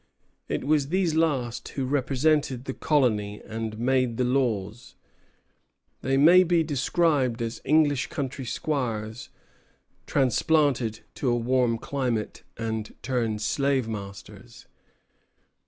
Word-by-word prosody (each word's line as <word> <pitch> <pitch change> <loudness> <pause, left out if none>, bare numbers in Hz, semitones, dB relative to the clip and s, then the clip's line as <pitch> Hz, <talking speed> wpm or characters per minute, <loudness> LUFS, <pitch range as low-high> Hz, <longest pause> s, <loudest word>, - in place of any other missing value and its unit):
It - - -2
was 145 0 +2
these 180 0 +1
last 130 -7 0
who 135 - -3
represented 140 0 +1
the 135 - -3
colony 110 -10 +1
and 110 -1 -5
made 125 -1 +1
the 125 - +1
laws. 120 -4 -1 1.1
They 135 +1 +1
may 170 +6 +7
be 170 -2 +2
described 145 -4 +1
as 115 -1 -4
English 145 -2 +3
country 135 -2 -4
squires 120 -5 -3 0.8
transplanted 135 -4 +1
to 130 - -1
a 120 - +2
warm 120 -1 +1
climate 120 -4 -3 0.2
and 110 -1 -4
turned 115 -4 -1
slave 135 0 +1
masters. 100 -3 -9
130 Hz, 110 wpm, -26 LUFS, 115-145 Hz, 1.1 s, may